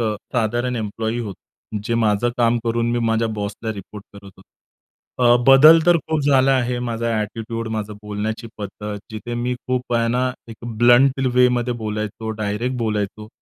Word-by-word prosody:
अ, 110 -2 0 0.2
साधारण 120 +1 0
एम्प्लॉई 110 +1 -3
होतो, 105 -1 -8
जे 115 +1 -1
माझं 110 0 +2
काम 120 0 +2
करून 115 0 0
मी 120 - 0
माझ्या 115 0 +1
बॉसला 105 +2 -4
रिपोर्ट 105 0 -10
करत 100 - -13
होतो. 95 - -17 0.8
अ, 120 -1 +5
बदल 150 +5 +8
तर 175 -1 +6
खूप 160 0 -2
झाला 135 -1 +4
आहे 125 -1 -1
माझा 115 0 -2
ॲटिट्यूड, 115 +2 -5
माझं 105 0 -4
बोलण्याची 105 +2 -4
पद्धत, 105 0 -6
जिथे 115 +2 -6
मी 120 +1 -1
खूप 125 -1 -1
आहे 115 0 +2
ना 125 +2 +1 0.2
एक 115 - -9 0.2
ब्लंट 125 +3 +5
वेमध्ये 125 -1 +3
बोलायचो, 110 +1 -4
डायरेक्ट 110 +5 -2
बोलायचो. 105 -2 -3
115 Hz, 160 wpm, -21 LUFS, 105-125 Hz, 0.8 s, बदल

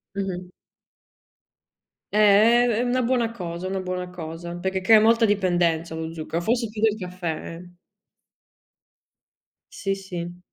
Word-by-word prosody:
Mh-mh. 190 -2 -3 1.7
Eh, - - 0
è 215 +4 +6
è 230 0 +1
una 250 +1 +1
buona 240 -2 +1
cosa, 175 -4 -6
una 190 0 -2
buona 180 0 -4
cosa, 170 0 -7
perché 190 +2 -2
crea 215 +3 +7
molta 230 +1 +4
dipendenza 175 -5 +1
lo 160 0 -5
zucchero, 165 +1 -4
forse 230 +4 0
più 215 0 -7
del 220 -2 +3
caffè, 180 -4 -5
eh. 175 +1 -13 2.0
Sì, 195 -1 -2
sì. 175 -2 -7
185 Hz, 130 wpm, -24 LUFS, 175-220 Hz, 2.0 s, crea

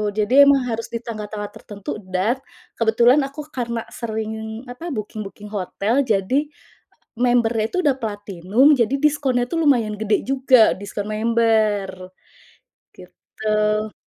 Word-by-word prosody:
Jadi 215 +3 0
emang 275 -2 +4
harus 230 -1 -3
di 230 - -3
tanggal-tanggal 210 -2 -6
tertentu 205 0 -7
dan 190 +8 0 0.4
kebetulan 235 +4 +4
aku 290 +2 -8
karena 235 -2 -3
sering, 220 0 -5
apa, 250 +8 -8
booking-booking 210 -1 -7
hotel, 205 +4 -1
jadi 225 +8 +1 0.7
member-nya 240 -2 +2
itu - - -2
udah 280 -3 +3
platinum, 205 - +2
jadi 240 +1 +1
diskonnya 280 -4 +1
tuh 330 -1 0
lumayan 230 -6 +2
gede 215 -1 +1
juga, 260 -3 +4
diskon 200 +1 -6
member, 215 -4 +1 0.8
gitu. 215 +3 -2
220 Hz, 120 wpm, -21 LUFS, 210-245 Hz, 0.8 s, emang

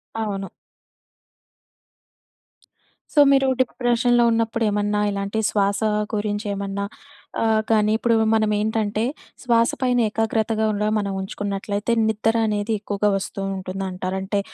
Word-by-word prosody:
అవును. 200 -3 -3 2.6
సో 300 - +3
మీరు 270 -1 +4
డిప్రెషన్‍లో 240 -1 +2
ఉన్నప్పుడు 230 0 0
ఏమన్నా 205 0 0
ఇలాంటి 200 +2 -2
శ్వాస 200 -1 +1 0.3
గురించి 205 0 -2
ఏమన్నా 200 0 -3 0.6
ఆహ్, 220 -1 +3
కానీ 215 -1 +3
ఇప్పుడు 230 0 +2 0.2
మనం 215 -1 +2
ఏంటంటే, 215 0 -1 0.4
శ్వాస 230 -1 +3
పైన 250 -1 +2
ఏకాగ్రతగా 220 0 0
కూడా 210 +1 0
మనం 200 -1 -1
ఉంచుకున్నట్లయితే, 200 +2 -3 0.2
నిద్ర 220 +1 +1
అనేది 210 +1 -1
ఎక్కువగా 205 0 0
వస్తూ 195 - -6 0.2
ఉంటుందంటారు. 185 0 -4
అంటే 200 +1 -1
210 Hz, 110 wpm, -22 LUFS, 200-225 Hz, 2.6 s, మీరు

